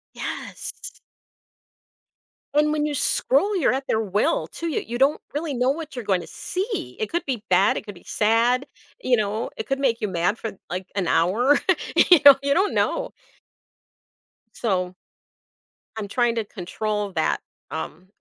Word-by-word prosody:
Yes. -, -, -7 dB, 1.5 s
And 300 Hz, +1 st, +3 dB
when 300 Hz, -1 st, 0 dB
you 300 Hz, -, -1 dB
scroll, 290 Hz, +7 st, +2 dB
you're 315 Hz, -, +3 dB
at 265 Hz, +1 st, -2 dB
their 220 Hz, -, +1 dB
will 215 Hz, -, 0 dB
to 335 Hz, -, -6 dB
you 315 Hz, -, -1 dB
you 240 Hz, +1 st, -4 dB
don't 275 Hz, +4 st, +3 dB
really 295 Hz, 0 st, -2 dB
know 250 Hz, +1 st, +1 dB
what 310 Hz, -1 st, -6 dB
you're 245 Hz, -3 st, -5 dB
going 190 Hz, -3 st, +1 dB
to -, -, -10 dB
see. 400 Hz, +5 st, -4 dB
It 435 Hz, -, -2 dB
could 345 Hz, +1 st, -2 dB
be 250 Hz, -6 st, -3 dB
bad, 185 Hz, +2 st, +4 dB
it -, -, -6 dB
could 205 Hz, -, -8 dB
be 175 Hz, -, -16 dB
sad, 235 Hz, +5 st, +2 dB, 0.4 s
you 250 Hz, -1 st, +3 dB
know, 215 Hz, +1 st, -1 dB
it 220 Hz, -, -5 dB
could 270 Hz, 0 st, -1 dB
make 245 Hz, -4 st, +1 dB
you 210 Hz, -, 0 dB
mad 180 Hz, +3 st, 0 dB
for, 225 Hz, -, -5 dB, 0.2 s
like, 185 Hz, +1 st, -4 dB
an 190 Hz, -4 st, 0 dB
hour, 235 Hz, -, +3 dB, 0.4 s
you 335 Hz, 0 st, +7 dB
know, 280 Hz, -1 st, +12 dB
you 280 Hz, 0 st, +2 dB
don't 385 Hz, +6 st, +2 dB
know. -, -, 0 dB, 1.4 s
So 185 Hz, -4 st, -1 dB, 1.0 s
I'm 210 Hz, -2 st, -3 dB
trying 240 Hz, +2 st, +1 dB
to 225 Hz, -, 0 dB
control 210 Hz, +2 st, -3 dB
that, 160 Hz, -2 st, +1 dB, 0.3 s
um, 180 Hz, +3 st, -6 dB
240 Hz, 170 wpm, -24 LUFS, 205-295 Hz, 1.5 s, know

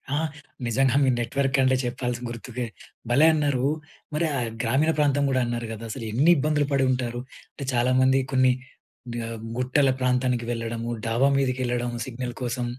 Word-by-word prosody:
ఆ! -, -, +1 dB, 0.5 s
నిజంగా. 130 Hz, +3 st, +2 dB
మీ 135 Hz, -, +4 dB
నెట్‌వర్క్ 135 Hz, +4 st, 0 dB
అంటే 130 Hz, 0 st, +4 dB
చెప్పాల్సింది 125 Hz, 0 st, -3 dB
గుర్తుకే 120 Hz, +1 st, -5 dB, 0.4 s
భలే 140 Hz, +6 st, +5 dB
అన్నారు. 145 Hz, -4 st, +1 dB, 0.5 s
మరి 155 Hz, +3 st, +1 dB
ఆహ్, 120 Hz, -2 st, -1 dB
గ్రామీణ 135 Hz, +7 st, +2 dB
ప్రాంతం 145 Hz, -1 st, +3 dB
కూడా 130 Hz, -1 st, +2 dB
అన్నారు 120 Hz, -1 st, -3 dB
కదా, 110 Hz, +1 st, -8 dB
అసలు 115 Hz, -1 st, -5 dB
ఎన్ని 145 Hz, +10 st, +4 dB
ఇబ్బందులు 150 Hz, 0 st, +1 dB
పడి 135 Hz, -1 st, +3 dB
ఉంటారు. 120 Hz, -1 st, -2 dB, 0.3 s
అంటే 140 Hz, -, -6 dB
చాలా 120 Hz, +1 st, +2 dB
మంది 130 Hz, +1 st, +4 dB
కొన్ని 130 Hz, -1 st, +5 dB, 0.8 s
ఆహ్, 115 Hz, -1 st, -6 dB, 0.2 s
గుట్టల 130 Hz, +2 st, +3 dB
ప్రాంతానికి 125 Hz, -1 st, +1 dB
వెళ్ళడము, 115 Hz, 0 st, -3 dB, 0.2 s
డాబా 120 Hz, +5 st, +3 dB
మీదకెళ్ళడం 125 Hz, -2 st, 0 dB, 0.2 s
సిగ్నల్ 125 Hz, 0 st, -5 dB
కోసం. 120 Hz, 0 st, -2 dB
125 Hz, 155 wpm, -25 LUFS, 120-135 Hz, 0.8 s, భలే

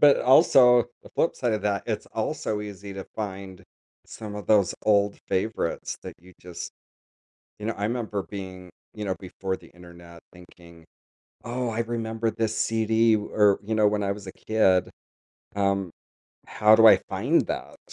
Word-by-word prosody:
but 145 Hz, -1 st, +6 dB
also, 125 Hz, -2 st, +6 dB, 0.2 s
the -, -, -15 dB
flip 165 Hz, -, +1 dB
side 120 Hz, -3 st, 0 dB
of 105 Hz, -2 st, -2 dB
that, 100 Hz, -1 st, 0 dB
it's -, -, -3 dB
also 105 Hz, -1 st, -3 dB
easy 100 Hz, -1 st, -8 dB
to 95 Hz, -1 st, -6 dB
find 95 Hz, -3 st, -6 dB, 0.4 s
some 105 Hz, -2 st, -8 dB
of 105 Hz, -1 st, -7 dB
those 105 Hz, -4 st, +3 dB
old 100 Hz, -1 st, +2 dB
favorites 95 Hz, -3 st, -2 dB
that -, -, -8 dB
you 90 Hz, +2 st, -18 dB
just 90 Hz, -1 st, -8 dB, 0.9 s
you 105 Hz, -, -6 dB
know, 115 Hz, -, -1 dB
I 100 Hz, -, -4 dB
remember 110 Hz, -3 st, -2 dB
being 95 Hz, -2 st, -8 dB, 0.2 s
you 105 Hz, -1 st, -6 dB
know, 95 Hz, -2 st, -1 dB
before 95 Hz, 0 st, -5 dB
the -, -, -17 dB
Internet 85 Hz, -1 st, -14 dB
thinking, 85 Hz, -2 st, -17 dB, 0.6 s
"Oh, 125 Hz, +1 st, -3 dB
I 115 Hz, +1 st, -2 dB
remember 115 Hz, -1 st, -2 dB
this 110 Hz, 0 st, -2 dB
CD." 110 Hz, 0 st, +2 dB
Or, 105 Hz, -1 st, +2 dB
you 110 Hz, +2 st, -3 dB
know, 105 Hz, -1 st, +4 dB
when 105 Hz, 0 st, -1 dB
I 100 Hz, -, 0 dB
was 100 Hz, -1 st, -10 dB
a 95 Hz, -, -7 dB
kid, 95 Hz, -5 st, +1 dB, 0.7 s
um, 100 Hz, -2 st, 0 dB, 0.6 s
"How 105 Hz, +1 st, +4 dB
do 115 Hz, 0 st, +7 dB
I -, -, +8 dB
find -, -, +1 dB
that?" -, -, -5 dB
105 Hz, 165 wpm, -25 LUFS, 95-110 Hz, 0.9 s, I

